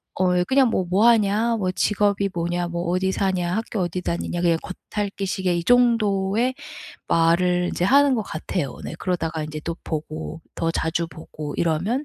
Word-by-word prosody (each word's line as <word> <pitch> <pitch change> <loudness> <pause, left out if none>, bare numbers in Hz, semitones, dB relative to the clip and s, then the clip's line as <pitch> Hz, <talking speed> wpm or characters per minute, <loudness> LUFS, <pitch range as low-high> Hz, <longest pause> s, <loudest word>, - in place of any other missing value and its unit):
어 180 -1 +2
그냥 260 +5 +3
뭐 190 -4 0
"뭐하냐. 215 +3 +3
뭐 185 -4 0
직업이 200 +1 +1
뭐냐. 175 0 -2
뭐 170 0 -3
어디 190 +1 +1
사냐. 185 -2 0
학교 225 -1 -3
어디 180 0 -2
다니냐." 175 0 -2
그냥 170 -2 +2
겉핥기 200 +1 -4
식의 185 -2 0
이 170 - -2
정도의 230 -1 +3 0.6
말을 175 +2 +3
인제 175 - -1
하는 275 +5 +5
것 225 - 0
같아요. 160 -6 -4
네. - - -5
그러다가 165 -3 -2
이제 155 0 -6
또 170 0 -4
보고 155 +1 -5
더 165 - -1
자주 165 +1 -1
보고 155 -2 -8
이러면 180 - 0
180 Hz, 320 characters per minute, -23 LUFS, 170-205 Hz, 0.6 s, 하는